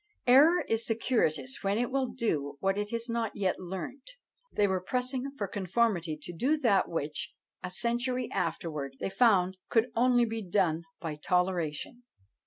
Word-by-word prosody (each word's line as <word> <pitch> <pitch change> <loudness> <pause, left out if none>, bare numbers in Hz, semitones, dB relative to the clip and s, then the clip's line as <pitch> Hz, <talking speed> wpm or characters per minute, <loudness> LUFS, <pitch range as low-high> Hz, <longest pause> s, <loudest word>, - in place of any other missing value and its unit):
Error 295 +8 +7
is 225 0 +1
circuitous 160 - 0
when 200 +1 0
it 245 +2 0
will 265 -1 +1
do 150 - -2
what 195 +3 +1
it 205 0 -2
has 230 +1 -3
not 230 -2 -2
yet 190 -3 0
learnt. 190 - -7 0.4
They 205 - +2
were 190 -1 0
pressing 255 +5 -2
for 200 - -2
conformity 190 -5 0
to 175 - -7
do 270 - +1
that 230 -9 +3
which, 165 +1 -4 0.3
a 180 - -4
century 240 +5 -1
afterwards, 155 -5 -3
they - - -3
found 190 -5 +3
could 230 +1 +2
only 245 0 +4
be 225 0 -3
done 175 -4 +1
by 155 -3 -4
toleration. 180 - -1
205 Hz, 160 wpm, -30 LUFS, 175-240 Hz, 0.4 s, Error